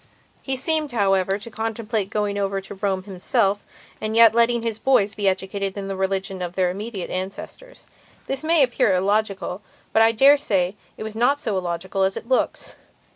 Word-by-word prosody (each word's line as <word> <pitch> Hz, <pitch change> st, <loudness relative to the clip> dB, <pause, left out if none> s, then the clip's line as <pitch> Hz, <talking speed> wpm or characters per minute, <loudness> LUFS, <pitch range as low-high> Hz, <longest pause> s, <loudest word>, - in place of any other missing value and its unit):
He 265 Hz, -, -1 dB
seemed, 305 Hz, 0 st, +1 dB
however, 195 Hz, -3 st, +2 dB
to 210 Hz, +3 st, -9 dB
contemplate 220 Hz, -2 st, -2 dB
going 210 Hz, -1 st, -1 dB
over 195 Hz, 0 st, -1 dB
to 195 Hz, -, -9 dB
Rome 195 Hz, -1 st, -2 dB
himself 200 Hz, +2 st, 0 dB, 0.4 s
and 215 Hz, 0 st, -2 dB
yet 230 Hz, -1 st, +7 dB
letting 235 Hz, 0 st, +3 dB
his 225 Hz, -2 st, -3 dB
boys 220 Hz, -5 st, +2 dB
be 205 Hz, -1 st, -1 dB
educated 190 Hz, +1 st, -2 dB
in 195 Hz, -1 st, -4 dB
the 195 Hz, -, -3 dB
religion 190 Hz, 0 st, -2 dB
of 175 Hz, 0 st, -5 dB
their 185 Hz, -2 st, +1 dB
immediate 200 Hz, 0 st, -6 dB
ancestors. 195 Hz, -, -7 dB, 0.4 s
This 270 Hz, +2 st, -2 dB
may 320 Hz, -2 st, +4 dB
appear 240 Hz, -6 st, +2 dB
illogical, 195 Hz, 0 st, -1 dB, 0.3 s
but 220 Hz, -, +4 dB
I 225 Hz, 0 st, +6 dB
dare 275 Hz, +6 st, +6 dB
say 195 Hz, -9 st, 0 dB, 0.2 s
it -, -, -6 dB
is 220 Hz, 0 st, -6 dB
not 250 Hz, +5 st, +2 dB
so 220 Hz, -7 st, -2 dB
illogical 185 Hz, +1 st, -3 dB
as 190 Hz, 0 st, +1 dB
it -, -, -8 dB
looks. 260 Hz, 0 st, -1 dB
205 Hz, 180 wpm, -22 LUFS, 190-230 Hz, 0.4 s, yet